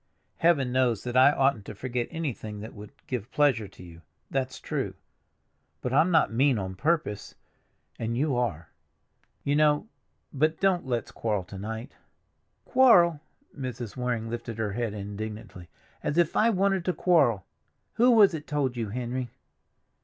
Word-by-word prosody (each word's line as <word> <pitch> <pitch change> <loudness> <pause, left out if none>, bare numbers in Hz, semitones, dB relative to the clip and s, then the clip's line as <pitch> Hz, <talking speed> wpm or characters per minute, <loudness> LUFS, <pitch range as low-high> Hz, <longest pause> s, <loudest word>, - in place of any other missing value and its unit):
Heaven 145 -7 +3
knows 125 -4 +1
that 120 0 -4
I 130 +2 +7
oughtn't 135 -6 +1
to - - -8
forget 120 +2 -3
anything 130 -10 -5
that 110 - -8
would 105 0 -11
give 120 -3 -4
pleasure 135 -8 +2
to 95 -1 -15
you—that's 85 - -6
true; - - -3 0.8
but 125 +9 -3
I'm 155 +6 +4
not 160 -9 +3
mean 130 +1 +3
on 95 -2 -4
purpose, 150 - -1 0.6
and 115 +1 -2
you 140 0 +1
are. 105 -10 -2 0.7
You 145 +1 +1
know—But 155 -1 -1
don't 185 -6 +1
let's 120 -3 -2
quarrel 105 -4 -2
to 95 +2 -10
night." 110 +5 -6 0.7
"Quarrel!" 180 - +5 0.3
Mrs. 125 -6 -6
Waring 125 -3 -2
lifted 115 -1 -5
her 110 -2 -1
head 115 0 -3
indignantly. 105 -3 -7 0.3
"As 150 - -2
if 170 -2 +2
I 225 - +4
wanted 195 -3 +1
to 180 - +1
quarrel! 145 - +3 0.5
Who 240 +3 +4
was 215 -6 +6
it 155 -2 -6
told 140 -4 -1
you, 115 -3 -3
Henry?" 125 +2 -3
125 Hz, 150 wpm, -27 LUFS, 110-150 Hz, 0.8 s, I